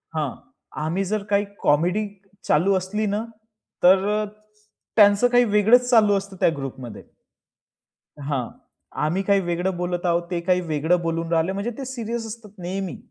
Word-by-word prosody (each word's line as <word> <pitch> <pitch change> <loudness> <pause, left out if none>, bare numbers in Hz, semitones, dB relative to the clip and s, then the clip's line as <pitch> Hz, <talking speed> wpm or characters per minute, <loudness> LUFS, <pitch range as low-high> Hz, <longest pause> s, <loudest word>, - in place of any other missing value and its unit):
हां. 150 -4 -1 0.5
आम्ही 170 +5 -1
जर 215 -1 -1
काही 205 0 +2 0.2
कॉमेडी 175 +8 +2 0.4
चालू 180 +7 +3
असली 205 +4 -2
ना, 205 +2 -1 0.6
तर 200 +4 +4 0.7
त्यांचं 205 +2 +6
काही 245 0 +4
वेगळच 240 +4 +5
चालू 215 -4 +5
असतं 195 0 -6
त्या - - +4
ग्रुपमध्ये. 130 -3 -7 1.2
हां. 140 -4 -2 0.5
आम्ही 175 +6 0
काही 200 0 +3
वेगळं 175 +1 -2
बोलत 175 0 -3
आहोत, 170 0 +2
ते 175 - 0
काही 180 +1 +1
वेगळं 160 +1 +1
बोलून 165 0 -2
राहिले, 165 +2 +2
म्हणजे 200 +5 -3
ते 275 - -5
सीरियस 235 -2 -4
असतात 220 -2 -10
नेहमी. 185 +1 -4
190 Hz, 145 wpm, -23 LUFS, 170-210 Hz, 1.2 s, त्यांचं